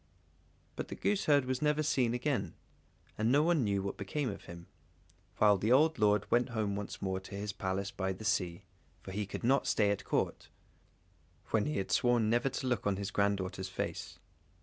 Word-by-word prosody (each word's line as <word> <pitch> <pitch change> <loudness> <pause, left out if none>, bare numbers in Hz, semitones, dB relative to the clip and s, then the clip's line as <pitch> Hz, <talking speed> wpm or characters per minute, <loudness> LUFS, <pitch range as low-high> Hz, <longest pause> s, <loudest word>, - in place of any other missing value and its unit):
But - - -4
the - - -6
gooseherd 150 -9 +2
was 130 0 -2
never 150 0 +2
seen 125 -6 +1
again, 135 +2 -1 0.6
and 110 +2 +2
no 145 +3 +5
one 165 -4 +3
knew 100 -2 0
what 100 - -4
became 125 +6 -2
of 100 - -10
him; 85 0 -10 0.7
while 105 -2 +5
the 110 +5 +1
old 155 +4 +4
lord 105 -1 +3
went 120 +1 +3
home 110 -4 -1
once 100 0 -6
more 95 -1 -1
to 95 +1 -10
his 100 0 -4
Palace 95 +1 -2
by 95 0 -2
the 95 +3 -7
sea, 90 -5 0 0.4
for 95 - -8
he 100 +1 -3
could - - -6
not 135 +3 +3
stay 105 -2 +3
at 100 0 -2
Court, - - -1 1.0
when 110 +2 +2
he 150 - -1
had 95 - -2
sworn 120 -3 +3
never 120 +3 +2
to 130 - -4
look 125 -4 0
on 100 - +2
his 100 0 -4
granddaughter's 95 -2 -1
face. 90 - -4
105 Hz, 195 wpm, -32 LUFS, 100-130 Hz, 1.0 s, no